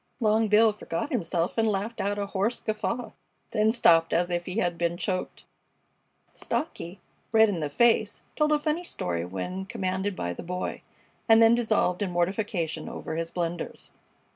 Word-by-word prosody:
Long 220 Hz, -1 st, +3 dB
Bill 215 Hz, +1 st, +5 dB
forgot 205 Hz, -, -4 dB
himself 175 Hz, -, -1 dB
and 225 Hz, -, +3 dB
laughed 210 Hz, +3 st, -1 dB
out 205 Hz, +1 st, -1 dB
a 200 Hz, -, -1 dB
hoarse 200 Hz, +4 st, -1 dB
guffaw, 230 Hz, +2 st, -3 dB, 0.4 s
then 215 Hz, +1 st, +3 dB
stopped 165 Hz, -8 st, +4 dB
as 175 Hz, +1 st, +1 dB
if 175 Hz, 0 st, -1 dB
he 185 Hz, +3 st, -4 dB
had 175 Hz, -5 st, +1 dB
been 170 Hz, 0 st, -1 dB
choked. 185 Hz, 0 st, -3 dB, 0.9 s
Stocky, 190 Hz, -, -4 dB, 0.3 s
red 220 Hz, -1 st, +6 dB
in 185 Hz, -5 st, -2 dB
the 150 Hz, -2 st, -2 dB
face, 220 Hz, +4 st, +2 dB
told 300 Hz, 0 st, +2 dB
a 300 Hz, -, +5 dB
funny 305 Hz, +3 st, -1 dB
story 85 Hz, -, -3 dB
when 140 Hz, -, -5 dB
commanded 190 Hz, -3 st, -2 dB
by 85 Hz, -, -3 dB
the -, -, -8 dB
Boy, 180 Hz, +1 st, -4 dB, 0.5 s
and 225 Hz, 0 st, +8 dB
then 225 Hz, 0 st, +7 dB
dissolved 220 Hz, -5 st, +1 dB
in 200 Hz, -, 0 dB
mortification 175 Hz, -2 st, -1 dB
over 160 Hz, -, -5 dB
his 165 Hz, 0 st, -2 dB
blunders. 170 Hz, -1 st, -4 dB
195 Hz, 165 wpm, -27 LUFS, 175-225 Hz, 0.9 s, and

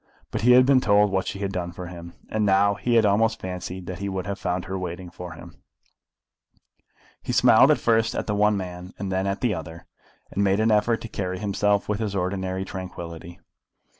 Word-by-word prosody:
But -, -, -2 dB
he 125 Hz, +3 st, +6 dB
had 125 Hz, 0 st, +7 dB
been 135 Hz, -1 st, +4 dB
told 105 Hz, -2 st, +4 dB
what 95 Hz, -1 st, -1 dB
she -, -, -4 dB
had 100 Hz, -1 st, -3 dB
done 90 Hz, -2 st, -3 dB
for 90 Hz, +1 st, -7 dB
him, 85 Hz, -1 st, -9 dB
and 110 Hz, -1 st, -1 dB
now 100 Hz, 0 st, +4 dB
he 120 Hz, +4 st, -1 dB
had 115 Hz, -2 st, +5 dB
almost 110 Hz, +2 st, +2 dB
fancied 90 Hz, 0 st, -6 dB
that 90 Hz, +2 st, -6 dB
he 100 Hz, 0 st, -3 dB
would 95 Hz, -1 st, -3 dB
have 100 Hz, 0 st, -4 dB
found 90 Hz, 0 st, -2 dB
her 95 Hz, -, -5 dB
waiting 90 Hz, -1 st, -5 dB
for 90 Hz, -2 st, -8 dB
him. 85 Hz, +1 st, -13 dB, 1.6 s
He -, -, -4 dB
smiled -, -, +5 dB
first 115 Hz, -1 st, +2 dB
at -, -, -2 dB
the 105 Hz, -, -1 dB
one 105 Hz, 0 st, +3 dB
man 90 Hz, -1 st, -7 dB
and 100 Hz, -1 st, -4 dB
then 95 Hz, +1 st, 0 dB
at 100 Hz, 0 st, -2 dB
the 120 Hz, -4 st, +1 dB
other, 80 Hz, 0 st, -8 dB, 0.5 s
and 100 Hz, -, 0 dB
made 100 Hz, +1 st, +2 dB
an 110 Hz, +1 st, +3 dB
effort 110 Hz, +2 st, +2 dB
to -, -, -6 dB
carry 95 Hz, -3 st, -4 dB
himself 100 Hz, +1 st, 0 dB
with 105 Hz, 0 st, -1 dB
his 105 Hz, -3 st, -2 dB
ordinary 95 Hz, 0 st, -2 dB
tranquillity. 85 Hz, -3 st, -8 dB
95 Hz, 210 wpm, -24 LUFS, 90-105 Hz, 1.6 s, had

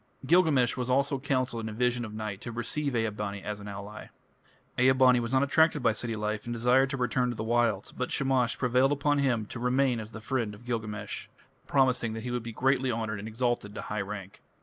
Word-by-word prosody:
Gilgamesh 145 Hz, -6 st, +4 dB
was 125 Hz, 0 st, -3 dB
also 140 Hz, +2 st, +2 dB
counselled 130 Hz, -4 st, -1 dB
in -, -, -3 dB
a -, -, -6 dB
vision 125 Hz, +1 st, 0 dB
of 110 Hz, -, -6 dB
night 105 Hz, -2 st, -5 dB
to 120 Hz, -, -5 dB
receive 135 Hz, +4 st, -1 dB
Ea 115 Hz, -1 st, +1 dB
bani 100 Hz, -1 st, -5 dB
as 105 Hz, -1 st, -4 dB
an 100 Hz, -, -9 dB
ally. 100 Hz, +1 st, -8 dB, 0.7 s
Ea 130 Hz, +1 st, +6 dB
bani 130 Hz, -1 st, +5 dB
was 115 Hz, 0 st, -3 dB
not 130 Hz, 0 st, +3 dB
attracted 150 Hz, 0 st, +3 dB
by 115 Hz, -2 st, +4 dB
city 115 Hz, +1 st, -3 dB
life 105 Hz, 0 st, -3 dB
and 120 Hz, -, -4 dB
desired 125 Hz, +3 st, +3 dB
to 135 Hz, -, -3 dB
return 125 Hz, 0 st, +1 dB
to 120 Hz, -, -3 dB
the 110 Hz, -, -4 dB
wilds, 115 Hz, -3 st, +1 dB
but 130 Hz, -, -3 dB
Shamash 130 Hz, -3 st, +1 dB
prevailed 125 Hz, +2 st, +3 dB
upon 145 Hz, 0 st, +1 dB
him 120 Hz, -6 st, +1 dB
to 115 Hz, -, -8 dB
remain 125 Hz, 0 st, +2 dB
as 110 Hz, -1 st, -7 dB
the 110 Hz, -, -9 dB
friend 115 Hz, -2 st, -2 dB
of 115 Hz, +4 st, -16 dB
Gilgamesh, 110 Hz, -3 st, -4 dB, 0.4 s
promising 130 Hz, -5 st, +2 dB
that 110 Hz, 0 st, -6 dB
he 125 Hz, -, -4 dB
would 125 Hz, 0 st, -1 dB
be 115 Hz, 0 st, -6 dB
greatly 130 Hz, +2 st, +1 dB
honoured 110 Hz, -2 st, -3 dB
and 105 Hz, -, -6 dB
exalted 110 Hz, -2 st, -2 dB
to -, -, -4 dB
high 105 Hz, 0 st, -3 dB
rank. 100 Hz, -1 st, -7 dB
120 Hz, 225 wpm, -29 LUFS, 110-130 Hz, 0.7 s, Ea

